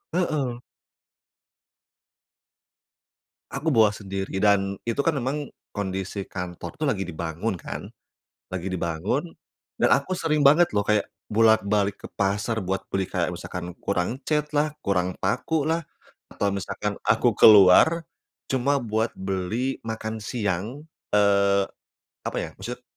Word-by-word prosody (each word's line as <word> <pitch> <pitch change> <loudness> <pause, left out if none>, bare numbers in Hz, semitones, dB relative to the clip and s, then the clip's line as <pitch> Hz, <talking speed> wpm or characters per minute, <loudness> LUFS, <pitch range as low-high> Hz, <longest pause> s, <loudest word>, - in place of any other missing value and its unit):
Heeh. 140 -9 -1 2.9
Aku 145 +4 -1
bawa 110 -4 +6
sendiri. 95 -2 -5
Dan, 100 -1 +3
itu 115 +3 -1
kan 155 +1 +1
memang 140 +2 -2 0.2
kondisi 95 -1 -4
kantor 90 -2 -6
tuh 155 - -3
lagi 95 -10 0
dibangun 85 +5 -3
kan, - - -7 0.6
lagi 90 -1 -4
dibangun. 95 - -2 0.5
Dan - - +3
aku 180 +7 0
sering 155 -2 +1
banget 150 +1 +5
loh, 105 - +3
kayak 105 +1 +1 0.2
bolak-balik 105 -2 +3
ke - - -8
pasar 100 +4 0
buat 95 +1 -1
beli 95 -1 0
kayak 90 -2 -1
misalkan 90 0 -6
kurang 100 +5 -1
catlah, 150 0 0
kurang 90 -2 0
pakulah, 160 - 0 0.5
atau 100 - 0
misalkan 100 -1 -3
aku - - +3
keluar 105 - +8 0.5
cuma 135 +1 +1
buat 110 0 -1
beli 95 +7 -2
makan 110 0 -4
siang, 105 +3 -3 0.3
eee, 100 -1 +4 0.6
apa - - -3
ya, - - -5
maksudnya 125 +5 -6
105 Hz, 120 wpm, -25 LUFS, 95-135 Hz, 2.9 s, keluar